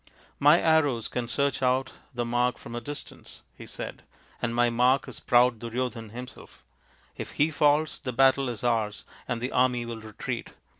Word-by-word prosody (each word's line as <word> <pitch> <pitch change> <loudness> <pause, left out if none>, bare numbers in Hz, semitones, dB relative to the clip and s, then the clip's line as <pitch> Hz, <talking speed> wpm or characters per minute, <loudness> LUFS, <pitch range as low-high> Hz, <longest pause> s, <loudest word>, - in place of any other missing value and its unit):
" - - -33
My 165 +4 +7
arrows 145 -8 +2
can 120 -1 -3
search^out 130 -1 +1 0.2
the 120 -1 -2
mark 120 +1 +1
from - - -10
a 120 - -4
distance," 145 +5 -9
he - - -11
said, - - -7 0.2
" - - -29
and 115 0 -1
my 120 0 +3
mark 125 +3 +3
is - - -7
proud 120 -1 +3
Duryodhan 115 -1 -4
himself. 125 +3 -10 0.5
If - - -6
he 155 +2 +2
falls, 150 +1 +2
the 130 - -4
battle 135 +1 +3
is 120 -2 -6
ours 110 -3 0 0.2
and 125 -2 -2
the 125 +3 -3
army 125 -1 +2
will 115 -1 -6
retreat. 110 -1 -6
125 Hz, 180 wpm, -27 LUFS, 120-135 Hz, 0.5 s, My